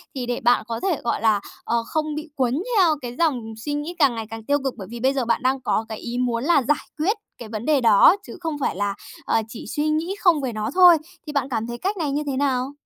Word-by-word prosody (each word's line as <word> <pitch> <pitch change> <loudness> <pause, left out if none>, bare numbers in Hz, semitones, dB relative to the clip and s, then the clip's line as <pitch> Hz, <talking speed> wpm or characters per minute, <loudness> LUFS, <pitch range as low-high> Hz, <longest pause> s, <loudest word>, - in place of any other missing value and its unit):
Thì 255 -2 -3
để 240 0 -2
bạn 245 +1 +3
có 230 -1 -3
thể, 370 -6 -1
gọi 235 - -1
là, 220 -2 +3 0.2
ờ, 235 0 0
không 310 -1 -2
bị 305 +1 -4
quấn 260 +5 0
theo 345 -5 +5
cái 245 -1 -6
dòng 250 -9 0
suy 290 +7 -4
nghĩ 295 +4 -4
càng 275 -6 +4
ngày 225 -1 -4
càng 225 0 -7
tiêu 285 +6 +2
cực, 270 -2 -1
bởi 195 -4 -8
vì 235 - -6
bây 260 +3 +2
giờ 265 -3 -1
bạn 230 0 +1
đang 260 +1 +1
có 225 - 0
cái 220 - -5
ý 240 +2 -5
muốn 245 -1 0
là 290 -3 +3
giải 295 +5 0
quyết 380 +9 +1 0.2
cái 230 - -9
vấn 220 +1 -5
đề 295 -3 +3
đó 225 - +7
chứ - - -9
không 325 -3 -3
phải - - 0
là, 200 +1 -1 0.3
ờ, 225 - +2
chỉ 225 +1 -8
suy 295 +6 -1
nghĩ 325 +5 -1
không 340 -6 +4
về 255 -3 -3
nó 215 0 -2
thôi. 360 -2 +8 0.3
Thì 300 - -5
bạn 275 -2 0
cảm 230 -3 -2
thấy 240 0 -5
cách 390 - -2
này 310 -5 -1
như 290 +2 -1
thế 270 -2 -1
nào? 265 -1 0
260 Hz, 275 wpm, -23 LUFS, 235-305 Hz, 0.3 s, thôi